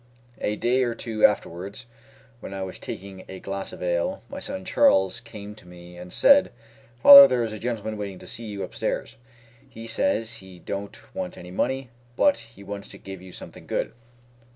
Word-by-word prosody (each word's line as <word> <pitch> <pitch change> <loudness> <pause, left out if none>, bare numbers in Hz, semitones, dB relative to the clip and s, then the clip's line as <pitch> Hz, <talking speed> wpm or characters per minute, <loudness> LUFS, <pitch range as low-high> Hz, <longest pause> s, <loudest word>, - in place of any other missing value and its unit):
A 105 - -1
day 125 +4 +1
or 120 -2 0
two 110 -2 -5
afterwards 100 +4 +1 0.5
when 100 - -8
I 95 - -3
was 95 - -7
taking 95 -1 -8
a 95 - -8
glass 100 +1 -5
of - - -8
ale, 85 -1 -1
my - - -6
son 95 - -6
Charles 95 +2 +3
came 105 -3 -10
to 105 -4 -17
me 90 0 -13
and 90 0 -10
said, 280 0 +5 0.5
"Father, 185 -1 +12
there 125 -6 +1
is 110 -1 -3
a 110 - -7
gentleman 110 -2 -3
waiting 100 -2 -5
to - - -13
see 115 - -8
you 100 -2 -5
upstairs. 115 +6 -4 0.5
He 115 -2 -10
says 115 0 0
he 95 -3 -13
don't 100 +3 -6
want - - -5
any 90 +1 -10
money, 130 +5 -2 0.2
but 285 - +3
he 115 -3 -14
wants 100 0 -7
to - - -12
give 95 -2 -9
you 95 0 -12
something - - -12
good." - - -2
100 Hz, 190 wpm, -25 LUFS, 95-115 Hz, 0.5 s, Father